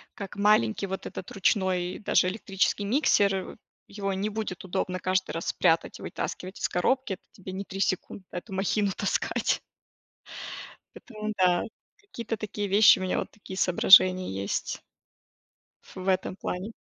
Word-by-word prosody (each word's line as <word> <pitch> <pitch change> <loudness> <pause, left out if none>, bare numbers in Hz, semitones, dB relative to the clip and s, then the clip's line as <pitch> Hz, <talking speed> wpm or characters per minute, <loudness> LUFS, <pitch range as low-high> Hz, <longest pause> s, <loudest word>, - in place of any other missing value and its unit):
как 195 -2 -7
маленький 200 - +3
вот 190 +1 -5
этот 180 - -7
ручной, 185 -3 0
даже 190 - +2
электрический 195 0 -1
миксер, 205 -4 +3
э, 190 - -5 0.3
его 200 -1 -3
не 195 +3 -1
будет 215 -4 -5
удобно 185 0 -2
каждый 185 0 0
раз 165 - -3
прятать 165 0 +1
и - - -12
вытаскивать 185 +1 -5
из - - -1
коробки, 260 +6 0
это 185 - -10
тебе 190 -1 -9
не 190 +1 -4
3 195 - -7
секунды 185 0 -1
эту 180 +3 -7
махину 200 +1 +1
таскать. 200 - 0 1.3
Поэтому 215 -2 -6
да. 180 -2 +3 0.3
Какие-то 235 - -6
такие 205 -1 -4
вещи, 200 +2 +7
у - - -3
меня 185 - 0
вот - - -4
такие 195 -2 -10
соображения 185 0 +6
есть 95 +1 -3 1.0
ф - - -17
в 185 0 -6
этом 185 0 0
плане. 185 +5 -4
190 Hz, 155 wpm, -27 LUFS, 185-205 Hz, 1.3 s, вещи